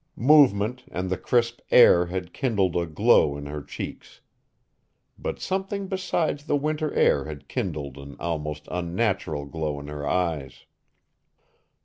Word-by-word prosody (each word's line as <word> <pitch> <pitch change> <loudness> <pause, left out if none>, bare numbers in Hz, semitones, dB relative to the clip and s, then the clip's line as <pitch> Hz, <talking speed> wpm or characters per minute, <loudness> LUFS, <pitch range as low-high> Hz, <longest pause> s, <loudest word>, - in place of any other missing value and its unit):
Movement 125 -4 +4
and 90 +1 -4
the - - +2
crisp 120 -1 +1
air 90 -8 +7
had 90 0 -5
kindled 100 - 0
a 85 -1 0
glow 75 -2 +3
in 70 - -7
her 75 +1 -5
cheeks. 70 - -8 1.0
But - - -4
something 195 +1 -2
besides 180 -6 -1
the 145 - +1
winter 150 +1 -1
air 70 - +3
had 75 -2 -8
kindled 70 -2 -4
an 70 0 -10
almost 75 -3 -4
unnatural 90 -4 -1
glow 75 0 -3
in 70 +1 -9
her 75 -1 -5
eyes. 80 -8 -2
90 Hz, 135 wpm, -25 LUFS, 75-125 Hz, 1.0 s, air